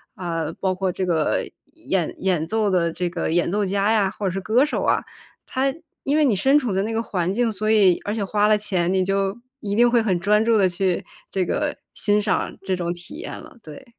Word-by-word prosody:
啊， 165 -3 -3
包 190 -1 0
括 185 0 -1
这 185 +1 -2
个 160 -4 0 0.3
演 195 - -2
演 180 -4 0
奏 220 -2 +1
的 170 -3 +1
这 175 +1 -2
个 170 -2 -2
演 170 0 +2
奏 205 +3 0
家 200 +3 +1
呀， 200 -3 +2
或 205 - -6
者 185 - +1
是 195 +1 -3
歌 235 +8 +3
手 300 - -2
啊， - - +2 0.4
它 270 +1 0 0.3
因 285 +3 +1
为 305 - +4
你 230 -7 +3
身 270 +9 +4
处 240 -8 -2
在 190 - +1
那 225 - -3
个 225 - 0
环 180 -3 -1
境， 235 0 +1
所 215 +1 -2
以 195 -5 +5
而 205 - -1
且 215 - -1
花 210 +1 +2
了 215 0 +4
钱， 185 -4 0
你 190 -1 +2
就 195 +2 0 0.2
一 200 -1 -3
定 240 +2 +5
会 240 -1 +3
很 190 -6 0
专 210 +4 +3
注 230 -1 +4
地 190 -2 +4
去 180 0 0 0.3
这 190 -2 0
个 - - -1 0.2
欣 205 +1 +2
赏 205 -3 -1
这 190 -1 -1
种 175 -1 -2
体 175 +9 -8
验 330 - -6
了， 315 -5 -14
对。 155 - -11
195 Hz, 255 characters per minute, -22 LUFS, 180-220 Hz, 0.4 s, 以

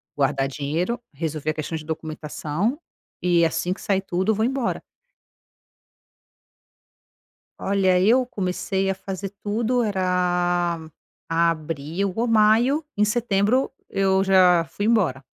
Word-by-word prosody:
guardar 135 -1 +1
dinheiro, 150 - -2 0.2
resolver 155 0 -3
a - - +1
questão 155 +1 -4
de 155 - -9
documentação, 160 - -3 0.4
e 175 -2 +3
assim 165 +3 -1
que - - -13
sair 195 -1 +1
tudo, 190 +2 0
eu - - 0
vou 220 +2 +1
embora. 260 -2 -1 2.8
Olha 190 -2 +2
eu 240 +7 +4
comecei 195 -2 -2
a - - 0
fazer 195 0 -6
tudo 230 +4 0
era 180 -3 0 0.5
abril 165 +2 -1
ou 235 +2 0
maio. 230 +7 +3
Em 210 - +3
setembro 215 +2 +1 0.2
eu 190 -1 +2
já 185 -3 +5
fui 205 - -4
embora. 185 - +2
185 Hz, 120 wpm, -23 LUFS, 165-210 Hz, 2.8 s, já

